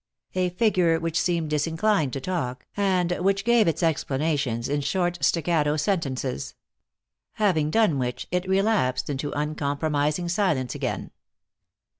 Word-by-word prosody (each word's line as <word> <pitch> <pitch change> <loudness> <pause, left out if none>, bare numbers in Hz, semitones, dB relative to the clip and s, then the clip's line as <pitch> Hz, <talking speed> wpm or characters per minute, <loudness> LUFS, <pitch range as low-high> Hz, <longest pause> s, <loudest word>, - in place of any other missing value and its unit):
A 185 -1 +1
figure 180 -4 +2
which 165 0 -1
seemed 170 -3 0
disinclined 160 +1 +1
to 135 - -2
talk, 130 -6 -3
and 185 -3 +1
which 195 +2 +1
gave 235 -4 +4
its 165 +1 0
explanations 140 -6 0
in 145 +1 0
short, 175 +4 -1
staccato 160 -3 +2
sentences. 140 - -2 0.8
Having 175 -8 +1
done 185 -6 +2
which, 125 -1 -3
it 180 +1 -1
relapsed 190 - +1
into 145 +1 -3
uncompromising 150 +2 -1
silence 155 - 0
again. - - -4
165 Hz, 125 wpm, -25 LUFS, 145-185 Hz, 0.8 s, gave